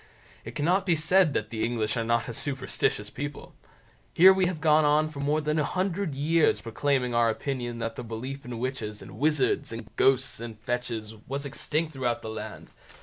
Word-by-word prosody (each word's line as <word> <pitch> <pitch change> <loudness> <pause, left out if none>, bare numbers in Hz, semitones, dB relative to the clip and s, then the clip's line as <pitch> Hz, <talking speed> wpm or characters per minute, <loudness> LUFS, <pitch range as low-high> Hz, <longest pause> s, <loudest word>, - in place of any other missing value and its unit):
It 115 +1 -9
cannot 180 +7 +1
be 175 - +4
said 165 0 +3
that 110 +1 -2
the 110 -2 -2
English 110 -2 0
are 115 - 0
not 115 0 +1
a 120 - -5
superstitious 130 -5 -2
people. 145 +4 -6 0.6
Here 190 +3 +9
we 190 -1 +2
have 175 -3 -3
gone 155 0 +4
on 150 +1 +3
for 145 - -8
more 145 +2 +1
than 150 +1 0
a - - +2
hundred 185 -1 -1
years 155 +3 +3
proclaiming 125 +1 0
our 115 -1 +4
opinion 120 0 -3
that 115 -1 -3
the - - -4
belief 125 +5 -6
in 120 -1 -6
witches, 115 -4 -4
and - - -11
wizards, 150 -3 +2
and 115 -3 -8
ghosts, 135 -1 +3
and 115 -2 -7
fetches, 120 -3 -3
was 140 +2 -3
extinct 155 +3 -2
throughout 125 -3 -1
the 110 - -5
land. 110 - -8
135 Hz, 195 wpm, -27 LUFS, 115-155 Hz, 0.6 s, Here